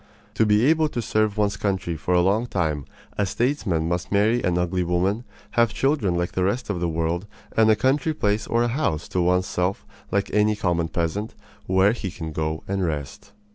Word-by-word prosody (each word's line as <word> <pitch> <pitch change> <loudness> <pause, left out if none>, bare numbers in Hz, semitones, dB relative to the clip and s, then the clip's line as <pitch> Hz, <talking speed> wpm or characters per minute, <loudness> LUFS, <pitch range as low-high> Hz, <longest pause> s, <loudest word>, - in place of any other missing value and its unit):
To 110 - +2
be 105 +3 +4
able 155 +1 +3
to 120 - -4
serve 110 -2 0
one's 100 -1 +1
country 95 -4 -1
for 90 +3 -1
a 90 - +5
long 105 +6 +2
time 80 - -1 0.3
a 100 - +3
statesman 100 - 0
must 90 0 -2
marry 110 +4 +3
an 90 -1 +1
ugly 90 +1 0
woman, 95 +7 0 0.3
have 115 -2 +2
children 135 - +1
like 85 0 -1
the 90 - -1
rest 105 +4 -1
of 90 - -3
the 85 0 0
world, 85 +4 -1 0.3
and 110 -1 +5
a 110 - +6
country 140 +7 +1
place 105 -4 0
or 115 +1 +2
a - - +1
house 120 - -1
to 90 - 0
one's 90 +1 +2
self 90 +2 -2 0.2
like 100 0 -1
any 105 0 +3
common 85 -5 0
peasant, 85 +7 -2 0.3
where 95 +2 +4
he 110 -4 -4
can 80 -2 -6
go 80 0 -3
and 95 0 -1
rest." 75 +2 -4
100 Hz, 205 wpm, -24 LUFS, 85-110 Hz, 0.3 s, a